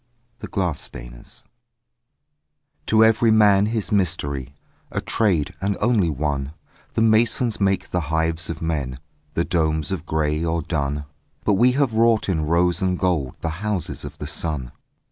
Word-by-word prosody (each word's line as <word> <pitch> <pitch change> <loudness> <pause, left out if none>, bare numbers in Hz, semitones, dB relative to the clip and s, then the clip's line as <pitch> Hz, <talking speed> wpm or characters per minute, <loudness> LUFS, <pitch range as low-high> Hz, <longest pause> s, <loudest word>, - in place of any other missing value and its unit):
THE - - -6
GLASS 90 -6 -1
STAINERS - - -10 1.4
To 110 0 +5
every 110 +1 +4
Man 105 -2 +5
his 110 -2 -2
Mystery, 70 -8 -1 0.3
A - - -2
trade 90 -10 0
and 100 +1 0
only 105 -6 +2
one: 70 -1 -2 0.4
The 115 - +3
masons 115 0 +2
make 95 -1 +1
the 90 - +1
hives 80 0 0
of 85 -1 -5
men, 70 -6 -2 0.4
The 85 - +1
domes 80 -2 0
of 85 -4 -4
grey 75 0 0
or 85 -1 -1
dun, 75 -2 -2 0.4
But 105 - +3
we 120 +6 +4
have 135 -3 +1
wrought 115 -1 +3
in 80 -4 0
rose 85 +2 +2
and 90 -1 +1
gold 85 -9 0
The 85 - -1
houses 105 -5 -3
of - - -8
the - - -6
sun. 75 -7 -3
85 Hz, 155 wpm, -22 LUFS, 75-105 Hz, 1.4 s, To